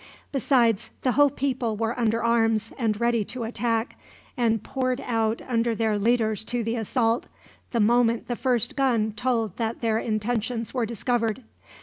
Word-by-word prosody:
Besides, 240 -5 +2
the 255 - +3
whole 290 +2 +5
people 255 -5 -2
were 225 +1 -1
under 230 0 +1
arms 225 -1 +2
and 220 -4 -1
ready 235 -2 +2
to 245 +2 -6
attack, 230 0 -2 0.4
and 225 -4 +1
poured 255 -1 -1
out 225 -2 -1
under 230 -2 +1
their 220 -2 0
leaders 220 -1 +1
to 240 -1 -2
the 225 +1 -1
assault, 230 +1 0 0.4
the 235 - -1
moment 230 +1 +3
the 240 - -2
first 245 -2 0
gun 235 -6 +2
told 225 -3 -1
that 225 -1 -2
their 225 -2 +1
intentions 225 +1 -2
were 245 -4 0
discovered. 235 +1 -1
230 Hz, 155 wpm, -25 LUFS, 225-245 Hz, 0.4 s, whole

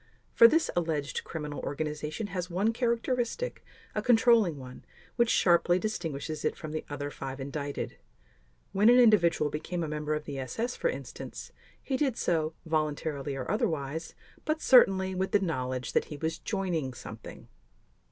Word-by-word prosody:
For 230 - +9
this 320 +7 +2
alleged 160 -4 -1
criminal 150 -2 -5
organization 150 +5 -3
has 180 -1 -3
one 200 +6 +1
characteristic, 240 - -1 0.3
a - - -1
controlling 225 - +4
one, 130 -1 -10 0.3
which 235 -1 +3
sharply 175 -2 +4
distinguishes 160 -7 -3
it - - 0
from 155 - -7
the 155 - -3
other 145 0 -4
five 135 0 -6
indicted. 140 +1 -4 0.7
When 205 +4 +5
an 245 - +7
individual 170 - +4
became 170 +3 -3
a - - -2
member 150 0 -2
of 150 - -5
the 140 -2 -5
SS 225 - -3
for - - 0
instance, - - -7 0.3
he 265 - -2
did 265 -4 0
so, 160 -2 0
voluntarily 150 -2 -1
or 130 -2 -3
otherwise, 160 - -2 0.3
but 310 0 -1
certainly 190 -9 +5
with 190 +1 -2
the 205 - +6
knowledge 130 -8 -2
that - - +2
he 150 - -8
was 160 +2 -3
joining 175 - -2
something. 110 -1 -10
165 Hz, 155 wpm, -29 LUFS, 145-215 Hz, 0.7 s, For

